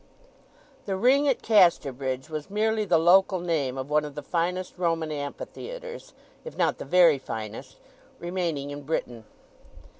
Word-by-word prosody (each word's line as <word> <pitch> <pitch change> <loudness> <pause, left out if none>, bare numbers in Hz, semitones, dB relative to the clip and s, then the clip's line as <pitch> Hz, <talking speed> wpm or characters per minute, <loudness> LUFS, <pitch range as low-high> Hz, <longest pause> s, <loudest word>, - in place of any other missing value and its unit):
The 195 - -1
Ring 265 +8 +3
at 270 - +1
Casterbridge 140 - +2
was 155 +1 -6
merely 215 +1 0
the 180 -4 +3
local 185 +3 +4
name 155 -7 -1
of 130 +2 -5
one 150 0 +3
of 150 -1 -8
the 150 - -6
finest 180 +3 -2
Roman 165 -3 0
Amphitheatres, 475 - -7 0.3
if 485 - -9
not - - +1
the - - -6
very 170 -6 +5
finest, 110 -4 -7 0.4
remaining 170 -5 -3
in 145 0 -7
Britain. 125 -6 -4
165 Hz, 145 wpm, -26 LUFS, 145-190 Hz, 0.4 s, very